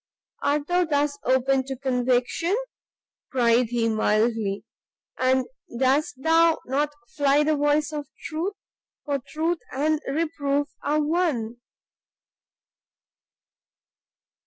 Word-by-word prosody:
"Art 285 0 +1
thou 355 +3 +2
thus 290 -2 0
open 260 +1 +2
to 270 0 -4
conviction?" 255 - 0 0.7
cried 240 -1 +3
he, 230 0 0
mildly; 215 -1 +1 0.6
"and 260 0 +2 0.3
dost 270 +5 +2
thou 330 0 +4
not 290 +3 0 0.2
fly 285 0 +3
the 310 +1 +2
voice 295 +1 +1
of 295 -2 -4 0.2
truth! 335 +6 -3 0.5
for 285 -2 -1
truth 320 +6 -2
and 305 +3 0
reproof 290 -1 -1
are 300 +1 +1
one." 295 -8 0
285 Hz, 100 wpm, -25 LUFS, 255-310 Hz, 0.7 s, thou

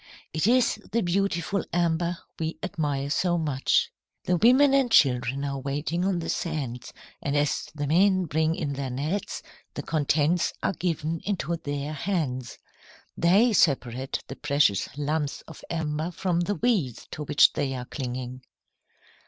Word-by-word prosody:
It 160 +5 +1
is 245 -2 +3
the 230 +1 +1
beautiful 185 0 0
amber 170 0 +1 0.2
we 160 0 -2
admire 145 -6 -2
so 175 +2 +1
much. 145 -5 +1 0.3
"The 180 - +1
women 260 - +5
and 270 -3 +3
children 130 - +3
are 140 -1 -3
waiting 145 +6 -2
on 190 -2 +1
the 165 - -4
sands, 135 -8 -3 0.3
and 140 +1 0
as 145 0 0
the 145 -1 -2
men 185 +4 +3
bring 160 +1 +1
in 145 -4 -3
their 135 -1 -3
nets, 150 +10 -3 0.3
the - - -4
contents 155 +2 +1
are - - +1
given 165 -2 -2
into 185 -4 -1
their 145 -1 -4
hands. 140 - -2 0.6
They 200 +8 +4
separate 130 - +1
the 135 - -8
precious 140 -9 +2
lumps 150 0 -1
of - - -13
amber 160 0 -2
from 180 -1 -1
the 195 +4 0
weeds 195 - 0
to 150 - -5
which 145 0 +5
they 135 -2 -1
are 125 -1 -5
clinging." 130 -1 -5
155 Hz, 150 wpm, -26 LUFS, 140-180 Hz, 0.6 s, women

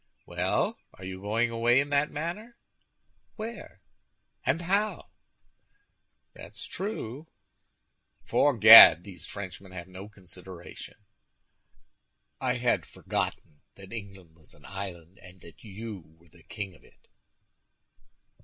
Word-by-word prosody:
"Well, - - -1 0.2
are 95 - -11
you 95 0 -7
going 115 +4 0
away 120 +2 +3
in 140 +1 -1
that 145 +1 +1
manner? 185 +10 -6 0.8
Where, 230 +2 -9 0.6
and 170 - 0
how?" 200 +4 -1 1.2
"That's - - -10
true!" 160 - -6 1.0
"Fore 145 -4 +2
Gad, 110 -6 +11
these 95 -2 -10
Frenchmen 95 -1 -9
have 85 -1 -8
no 95 +2 -11
consideration!" 90 -3 -12 1.4
"I - - -1
had - - 0
forgotten 75 -2 -5
that 95 +2 -13
England 95 -6 -10
was 80 -2 -18
an - - -20
island, 95 -2 -8
and 90 +1 -16
that 85 - -16
you 105 0 -8 0.2
were 85 0 -24
the - - -21
king 100 -3 -7
of - - -21
it." - - -25
100 Hz, 115 wpm, -28 LUFS, 95-135 Hz, 1.4 s, Gad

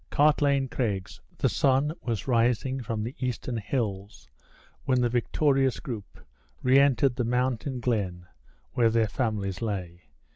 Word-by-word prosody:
Cartlane 145 -2 +3
Craigs. 100 -8 -3 0.2
The - - +2
sun 140 +3 +2
was 115 -1 -3
rising 125 +2 +1
from 110 -2 -3
the 120 +4 -4
eastern 125 -1 -3
hills 105 - -3 0.6
when 130 -2 +2
the 120 -1 +2
victorious 135 +2 +1
group 110 -6 -7 0.4
re 130 +2 +5
entered 135 -2 +3
the 125 - +1
mountain 125 +2 -1
glen 100 -7 -1 0.5
where 115 -2 +3
their 115 -1 +2
families 105 -5 -2
lay. 90 -6 -4
120 Hz, 135 wpm, -27 LUFS, 110-130 Hz, 0.6 s, re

